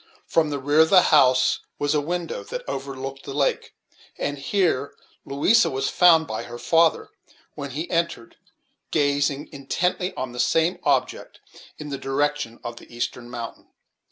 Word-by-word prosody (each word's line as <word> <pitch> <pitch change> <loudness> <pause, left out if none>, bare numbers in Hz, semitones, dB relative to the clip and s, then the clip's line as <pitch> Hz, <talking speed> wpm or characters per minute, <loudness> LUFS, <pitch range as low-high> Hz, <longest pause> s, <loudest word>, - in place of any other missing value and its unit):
From 160 -2 +1
the 145 - -2
rear 145 +3 +1
of 160 0 +6
the 190 - +8
house 130 -3 +5 0.2
was 145 +1 0
a 150 - +2
window 170 +2 -4
that - - -7
overlooked 135 0 -5
the 135 - -7
lake; 140 -2 -1 0.4
and 145 0 -3
here 160 -3 0 0.3
Louisa 200 +12 +3
was 135 +1 -2
found 165 -3 +5
by 110 -7 -4
her 120 - -8
father, 165 +5 +2 0.4
when 140 - -6
he 155 +6 -4
entered, 170 -9 -2 0.5
gazing 145 -1 0
intently 180 +7 -1
on 125 -1 -5
some 165 +7 +2
object - - -1 0.4
in 150 - -7
the 140 -1 -4
direction 140 -3 -1
of 120 0 -6
the - - -14
eastern 120 +1 -4
mountain. 120 -1 -7
145 Hz, 155 wpm, -24 LUFS, 135-165 Hz, 0.5 s, the